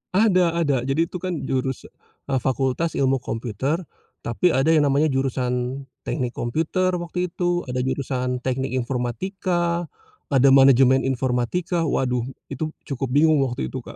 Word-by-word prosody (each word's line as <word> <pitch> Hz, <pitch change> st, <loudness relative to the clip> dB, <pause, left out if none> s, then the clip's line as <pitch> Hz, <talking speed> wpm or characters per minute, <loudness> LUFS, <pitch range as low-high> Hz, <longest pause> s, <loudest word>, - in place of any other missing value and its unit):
Ada 180 Hz, -5 st, +3 dB
ada 140 Hz, -3 st, +2 dB
jadi 145 Hz, +5 st, +2 dB
tuh 180 Hz, -, -5 dB
kan 185 Hz, 0 st, -3 dB
jurusa 130 Hz, -1 st, -3 dB, 0.4 s
eee, 130 Hz, -, +2 dB
fakultas 135 Hz, +5 st, -1 dB
ilmu 135 Hz, -1 st, +2 dB
komputer 125 Hz, -, -2 dB, 0.4 s
tapi 145 Hz, +10 st, +1 dB
ada 140 Hz, +5 st, +3 dB
yang 150 Hz, -3 st, +4 dB
namanya 145 Hz, +2 st, +2 dB
jurusan 130 Hz, 0 st, -1 dB, 0.2 s
teknik 125 Hz, -5 st, -1 dB
komputer 165 Hz, +9 st, 0 dB
waktu 180 Hz, +1 st, -2 dB
itu, 175 Hz, 0 st, 0 dB
ada 125 Hz, 0 st, -2 dB
jurusan 125 Hz, -1 st, -2 dB
teknik 130 Hz, +1 st, -1 dB
informatika, 170 Hz, +8 st, -1 dB, 0.5 s
ada 135 Hz, 0 st, +5 dB
manajemen 135 Hz, -1 st, +6 dB
informatika, 135 Hz, +7 st, 0 dB
waduh 125 Hz, -4 st, 0 dB, 0.3 s
itu 155 Hz, +3 st, -3 dB, 0.2 s
cukup 135 Hz, -1 st, -3 dB
bingung 155 Hz, +1 st, +4 dB
waktu 125 Hz, +1 st, -3 dB
itu, 130 Hz, -, -4 dB
Kak. -, -, -11 dB
135 Hz, 140 wpm, -23 LUFS, 125-170 Hz, 0.5 s, manajemen